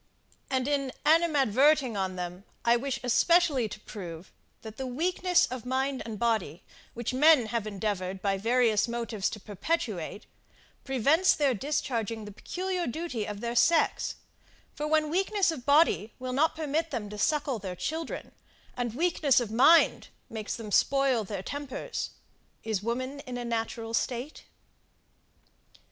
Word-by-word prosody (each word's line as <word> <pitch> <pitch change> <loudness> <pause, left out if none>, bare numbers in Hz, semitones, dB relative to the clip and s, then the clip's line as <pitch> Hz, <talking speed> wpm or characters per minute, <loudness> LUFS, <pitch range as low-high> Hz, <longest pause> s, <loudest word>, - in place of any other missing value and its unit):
And 260 -1 0
in 280 -2 0
animadverting 290 -5 +4
on 190 -1 -2
them, 180 +1 -6 0.2
I 235 0 +5
wish 260 +1 -2
especially 275 -1 +3
to 210 - -8
prove, 175 -5 -8 0.3
that 220 -1 -9
the 265 - -4
weakness 355 +6 +2
of 250 -2 -6
mind 265 +1 -1
and 220 -2 -5
body, 215 -8 -1 0.3
which 235 +1 -3
men 295 -1 +6
have 220 -1 -2
endeavoured 195 -2 -3
by 195 0 0
various 230 0 +2
motives 235 -4 -2
to 215 - -7
perpetuate, 205 - -3 0.6
prevents 280 - +3
their 285 -3 +2
discharging 230 -4 -2
the 205 - -8
peculiar 365 - -3
duty 255 -5 -3
of 205 -1 -6
their 235 0 -3
sex: 330 +7 +3 0.6
for 300 0 -3
when 305 -1 +2
weakness 385 +1 +2
of 260 -5 -8
body 280 - +3
will 255 0 -5
not 305 +5 +2
permit 315 +1 -1
them 235 -7 -4
to 210 - -7
suckle 285 -2 +1
their 190 -2 -5
children, 320 - -4 0.4
and 240 -2 -3
weakness 310 -4 +3
of 235 -3 -4
mind 270 +9 +5 0.2
makes 220 -1 -4
them 220 -3 -8
spoil 270 -1 +3
their 200 -2 -5
tempers 285 +1 -5 0.5
is 220 -4 -1
woman 255 +5 -3
in 250 -1 -4
a 245 - -4
natural 225 0 -3
state? 250 +5 -2
245 Hz, 145 wpm, -28 LUFS, 215-295 Hz, 0.6 s, men